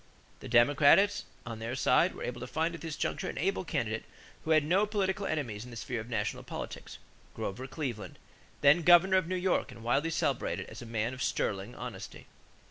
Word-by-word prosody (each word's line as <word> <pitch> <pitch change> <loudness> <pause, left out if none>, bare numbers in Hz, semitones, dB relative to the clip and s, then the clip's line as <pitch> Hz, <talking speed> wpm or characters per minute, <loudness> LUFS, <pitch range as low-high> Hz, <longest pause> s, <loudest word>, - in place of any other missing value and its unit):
The - - -9
Democrats 145 - +5 0.2
on 115 -2 -6
their 115 +3 -4
side 130 - +3
were - - -7
able - - -4
to - - -5
find 165 +2 -1
at 165 - -8
this 160 -2 -4
juncture 185 - -2
an - - -6
able 195 0 0
candidate 115 -10 -2 0.4
who - - -7
had 155 -2 +5
no 185 +7 +2
political 200 -1 -1
enemies 120 -9 -3
in 125 - -10
the 120 - -9
sphere 120 0 -3
of 115 - -10
national 105 -3 -2
politics, - - -7 0.4
Grover 125 +7 -4
Cleveland, 120 - -5 0.4
then 145 +4 +6
governor 175 +3 +6
of 185 -3 +1
New 185 - -1
York 180 -6 0
and 115 -2 -12
widely 135 +7 +1
celebrated 165 - -1
as - - -9
a 120 - -8
man 115 +1 -1
of 130 - -8
"sterling 100 +1 -1
honesty." - - -8
145 Hz, 200 wpm, -31 LUFS, 115-175 Hz, 0.4 s, then